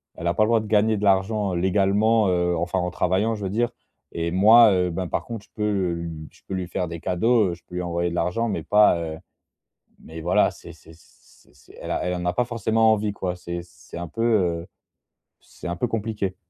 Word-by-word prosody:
Elle 85 - -7
a 85 - +2
pas 110 - +2
le - - +2
droit 115 -1 +3
de 110 - -8
gagner 110 +1 +3
de 100 - -5
l'argent 100 0 +1
légalement, 100 +4 +2
heu, 90 -1 +1
enfin 85 +3 -1
en 90 0 -2
travaillant, 95 +5 0
je 105 - -7
veux 95 - -2
dire. 120 +4 0 0.4
Et 85 0 -2
moi, 110 +4 +7
heu, 90 -1 +1
ben, 90 +2 -3
par - - -2
contre, 115 -3 -7
je - - -35
peux 105 -1 -1
le 95 -4 0
lu 80 -2 -7
je - - -23
peux - - -5
lui 95 -1 -3
faire 90 0 -2
des 85 0 -7
cadeaux, 110 +3 +2
heu, - - -4
je 85 - -23
peux 90 - -10
lui 90 - -2
envoyer 85 0 -1
de 85 - -5
l'argent 90 +7 0
mais - - -3
pas, 105 -3 +4
heu, 80 -1 -5 0.9
mais 80 +1 -9
voilà, 85 +3 +2
c'est - - -12
c'est 80 - -17
c'est 80 - -24
c'est - - -19
elle - - -7
a - - -1
elle 90 0 -1
en 90 0 -4
a 90 - +1
pas 125 - +1
forcément 110 -1 +2
envie 105 -1 0
quoi, 95 -3 -3
c'est 85 -1 -6
c'est 85 - -12
un 85 - -5
peu, 115 +8 -4
heu, 90 -8 +1 0.8
c'est - - -11
un 85 - -2
peu 120 - 0
compliqué. 105 -4 -3
95 Hz, 245 wpm, -23 LUFS, 85-110 Hz, 0.9 s, moi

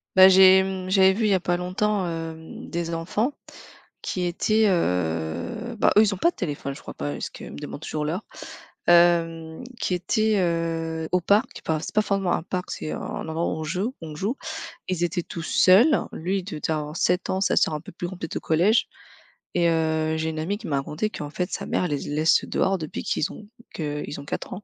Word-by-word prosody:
Bah 190 0 +10
j'ai, 190 0 +8
mmh, 190 -1 -4
j'avais 190 -1 +6
vu 220 +3 0
il 210 - +3
y - - +4
a 190 - +3
pas 175 0 0
longtemps, 190 +2 0
hem, 165 -1 -6
des 170 0 -3
enfants, 205 - -1 0.7
qui 180 -1 -2
étaient, 215 +5 +2
heu 90 - -1
bah, - - +5
eux - - +9
ils 210 -2 +2
ont - - -9
pas 340 - +4
de - - -37
téléphone, 145 -5 -4
je - - -12
crois - - -8
pas 70 0 -3
parce - - -4
qu'ils - - -9
me - - -9
demandent 145 - -7
toujours 155 -2 -3
l'heure. 175 +8 -2 0.6
Hem, 165 0 +3 0.2
qui 185 - 0
étaient, 215 +3 +1
heu, 165 -2 -1
au 180 - +3
parc. 205 +5 +1
Enfin 160 -1 0
c'est 155 - -7
pas 215 - +5
forcément 195 -3 0
un - - -1
parc, 180 0 -4
c'est 155 - -4
un - - -4 0.3
endroit 160 +2 -1
où - - -2
on - - -3
joue 190 - -2
on 155 -2 -7
joue. 205 - -2 0.5
Ils 180 -2 0
étaient 175 0 -1
tous 170 - -7
seuls, 210 - +5 0.2
lui 185 +4 -1
il 185 - -7
de 155 -7 -6
devait 160 - -2
avoir 150 0 -4
7 180 +1 +1
ans, 190 +1 -1
sa 190 - +2
sœur - - +3
un 150 - -5
peu - - -11
plus 175 - -5
grande, 185 0 -9
peut-être 165 - -4
au - - -4
collège. 180 +8 +3 0.7
Et 170 -1 +3
heu, 160 -1 +1
j'ai 160 0 -1
une 155 - -5
amie 195 +6 -1
qui 225 - -12
m'a 140 - 0
racontée 150 +10 -2
qu'en 145 -1 -6
fait 180 +2 -3
sa - - -3
mère 180 - 0
les 145 -2 -1
laisse 155 +2 +2
dehors 195 0 +1
depuis 155 - -5
qu'ils - - -1
ont 210 - -11 0.3
que 150 -2 -3
ils 145 - -6
ont - - -12
quatre - - -5
ans. 200 - -8
175 Hz, 230 wpm, -25 LUFS, 160-190 Hz, 0.7 s, Bah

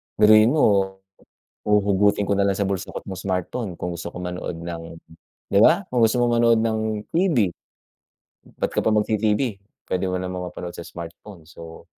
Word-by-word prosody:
biruin 110 +2 +6
mo, 100 -9 +2 0.7
huhugutin 100 0 +3
ko 100 - 0
na 100 0 +2
lang 95 - 0
sa 100 - +1
bulsa 95 -2 -3
ko - - -5
at - - -16
yung 95 -1 -6
smartphone 95 +3 -3
kung 90 0 -4
gusto 85 0 -6
ko - - -9
manood 90 -1 -5
ng, 85 0 -6 0.7
'di - - +5
ba? - - +5
Kung 125 - +2
gusto 115 +2 +3
mo 120 - +3
manood 115 -1 +4
ng 110 -1 -1
TV. 155 - +2 1.1
Ba't - - -1
ka - - +2
pa 110 - +2
mag-TV, 105 +1 +1 0.5
puwede 95 +1 -1
mo 90 - -2
naman 90 0 -4
mapanood 90 0 -7
sa 85 - -7
smartphone 85 +1 -10
so, 80 0 -12
100 Hz, 180 wpm, -23 LUFS, 90-110 Hz, 1.1 s, biruin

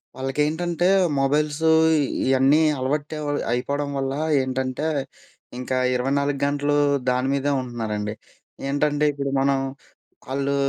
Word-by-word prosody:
వాళ్ళకేంటంటే 155 +6 0 0.3
మొబైల్స్ 145 +2 +1 0.4
ఇ - - +2 0.2
ఇయన్నీ 135 +3 +4 0.2
అలవాటు 145 +4 -2
అ - - -5
వ్ 145 0 -1
అయిపోవడం 140 +4 -1
వల్ల 135 0 -2 0.3
ఏంటంటే, 130 +3 -2 0.7
ఇంకా 125 +1 -2 0.2
24 140 +3 0
గంటలు 145 +1 0 0.3
దాని 125 +1 +1
మీదే 140 +1 0
ఉంటున్నారండి. 110 -4 -4 0.6
ఏంటంటే 145 +1 +1
ఇప్పుడు 140 -1 -4
మనం 135 0 +2 0.8
ఆళ్ళు 140 0 0
140 Hz, 110 wpm, -23 LUFS, 130-145 Hz, 0.8 s, ఇయన్నీ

